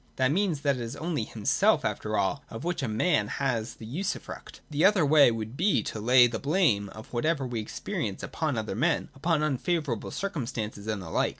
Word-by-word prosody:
That 130 0 +2
means 175 -4 +1
that 140 -2 +1
it - - -5
is 115 +3 -5
only 155 -6 -2
himself 105 -2 +2
after - - -2
all - - 0
of 115 - -7
which 175 -1 -2
a 135 - -1
man 110 0 +1
has 120 -3 -2
the 110 - -10
usufruct. 170 - -5
The 150 +1 +1
other 195 -5 +5
way 145 -1 +7
would 115 +1 -4
be 185 +7 +2
to 110 - -5
lay 125 +3 +6
the 115 -2 -2
blame 140 - +2
of 110 +4 -12
whatever 140 +3 0
we 120 -2 -3
experience 105 - -4
upon - - -2
other - - -2
men, - - 0
upon 155 +2 0
unfavourable 150 -3 -1
circumstances, 115 - -4
and 105 -3 -2
the 80 - -8
like. - - +2
130 Hz, 200 wpm, -28 LUFS, 110-160 Hz, -, way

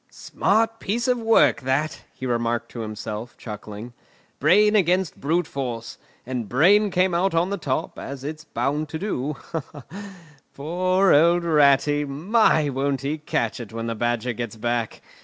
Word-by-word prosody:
"Smart 225 +2 0
piece 235 +5 -2
of 250 -1 +2
work 225 0 +4
that!" 135 +4 -1
he 130 - -8
remarked 120 -1 -1
to 120 - -8
himself 110 +1 -6
chuckling. 105 +1 -8 0.5
"Brain 210 +3 +4
against 185 -3 +1
brute 165 +5 +1
force—and 120 -2 -6
brain 200 +11 +4
came 180 0 +1
out 175 +1 +1
on 175 +4 +1
the 200 - -1
top—as 135 -1 -4
it's 155 +2 -6
bound 145 +6 -2
to 160 - -4
do. 150 -7 -3 1.2
Poor 185 +6 +2
old 170 +4 +4
Ratty! 145 -2 +3
My! 155 +3 +2
won't 135 0 -1
he 145 +3 -3
catch 120 -7 -2
it 115 -3 -8
when 115 0 -5
the 115 - -2
Badger 120 +1 -1
gets 120 -1 -5
back! 120 0 -3
145 Hz, 145 wpm, -23 LUFS, 120-180 Hz, 1.2 s, work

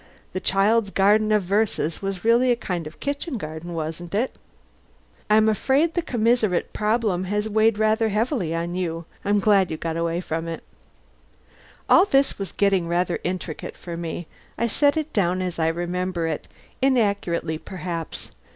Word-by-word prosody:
The 185 - -1
'Child's 200 +3 +2
Garden 210 +3 +3
of 210 -2 +3
Verses' 195 -4 0
was 195 0 -4
really 240 +2 +4
a 245 - +4
kind 180 -8 -4
of 155 - -12
kitchen 285 0 -3
garden, 160 0 -6
wasn't 165 +3 -4
it? 240 +5 0 0.9
I'm 215 +1 +5
afraid 270 - +2
the 345 - +1
commissariat 230 - +1
problem 210 -4 0
has 210 +3 -1
weighed 220 0 +3
rather 220 +1 +2
heavily 210 - 0
on 170 +1 -2
you. 170 -2 -3 0.2
I'm 205 0 +2
glad 200 -3 +4
you've 160 - -4
got 165 -1 -3
away 170 0 0
from 165 -2 -3
it." 165 -1 -5 1.2
All 365 - +7
this 275 - +2
was 195 - -4
getting 195 -4 +2
rather 175 +1 0
intricate 180 -3 -4
for 170 -1 -7
me. 170 0 -5 0.3
I 235 - +1
set 285 +6 +2
it 310 0 -3
down 185 -3 +1
as 180 -2 -3
I 160 - +2
remember 175 +1 -1
it, 160 -2 -3 0.3
inaccurately 200 -11 +1
perhaps. 170 -2 -6
195 Hz, 160 wpm, -24 LUFS, 170-220 Hz, 1.2 s, All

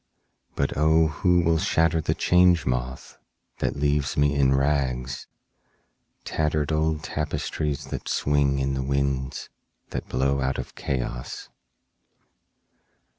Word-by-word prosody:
(But 70 - -1
O 80 +2 +4
who 90 +2 +2
will 80 -1 +2
shatter 80 0 +2
the - - 0
Change 90 -4 +4
Moth 65 0 -3 0.4
that - - -1
leaves 70 -1 0
me 75 0 +3
in 70 -2 +3
rags—tattered 70 +3 -3
old 80 0 0
tapestries 75 -1 -3
that - - -5
swing 70 -1 +2
in 70 0 0
the 65 - -1
winds 70 0 -2 0.4
that - - -5
blow 70 +1 +1
out 65 0 0
of - - -6
Chaos!) 60 -2 -4
70 Hz, 115 wpm, -25 LUFS, 65-80 Hz, 0.4 s, O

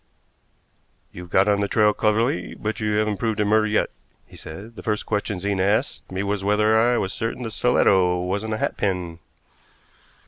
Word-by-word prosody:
"You've 90 -1 -10
got 95 +3 +3
on 100 -1 +3
the 100 - 0
trail 105 0 +3
cleverly, 105 -4 0
but 110 +1 -4
you 105 -1 -1
haven't 105 -1 0
proved 110 0 -2
it 105 - +2
murder 110 +1 +3
yet," 105 0 0 0.3
he - - -17
said. 100 +9 -10
"The - - -9
first 105 -1 -2
question 105 -2 -2
Zena 100 0 -1
asked 105 +6 -1
me 95 +1 -2
was 100 -1 -2
whether 105 +2 +3
I 120 +2 +3
was 95 - -2
certain 115 +2 -3
the 115 - -4
stiletto 95 -6 +3
wasn't 100 +5 -2
a - - -4
hatpin." 90 -6 -2
105 Hz, 180 wpm, -23 LUFS, 95-110 Hz, 0.3 s, got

